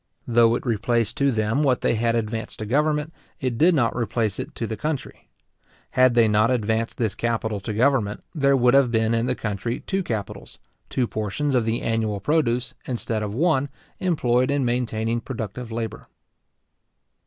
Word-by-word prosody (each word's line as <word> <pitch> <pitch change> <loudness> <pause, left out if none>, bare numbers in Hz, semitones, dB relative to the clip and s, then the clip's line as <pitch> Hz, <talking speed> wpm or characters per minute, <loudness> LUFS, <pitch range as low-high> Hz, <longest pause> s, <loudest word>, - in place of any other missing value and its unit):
Though 115 -1 +4
it - - -4
replaced 115 -1 0
to 140 0 +3
them 115 +2 0
what 135 -4 +2
they - - +2
had 115 +1 +1
advanced 110 0 -3
to 110 - -5
government, 150 +5 0 0.3
it 130 -3 -1
did 165 +8 +4
not 120 -5 +1
replace 115 -3 -1
it - - -6
to 115 - -3
the 110 - -4
country. 145 +4 -5 0.6
Had 130 -1 +4
they 115 -2 +5
not 105 +2 +3
advanced 115 -2 0
this 110 -4 0
capital 110 -3 -2
to 100 +3 -5
government, 110 -2 +1
there 140 -3 +3
would 125 -1 +4
have 135 -2 +5
been 110 -1 +1
in 115 +1 +1
the 125 - 0
country 110 +2 -3
two 195 0 -1
capitals, 110 - -5 0.3
two 130 - 0
portions 110 +7 -2
of 125 -3 +2
the 115 +1 -1
annual 110 -3 0
produce, 130 -3 0
instead 115 -3 -2
of 105 0 -4
one, 145 -2 +2 0.3
employed 130 -8 +1
in 140 -2 +1
maintaining 115 -1 -1
productive 115 -1 -6
labour. 115 -1 -5
120 Hz, 175 wpm, -24 LUFS, 110-130 Hz, 0.6 s, they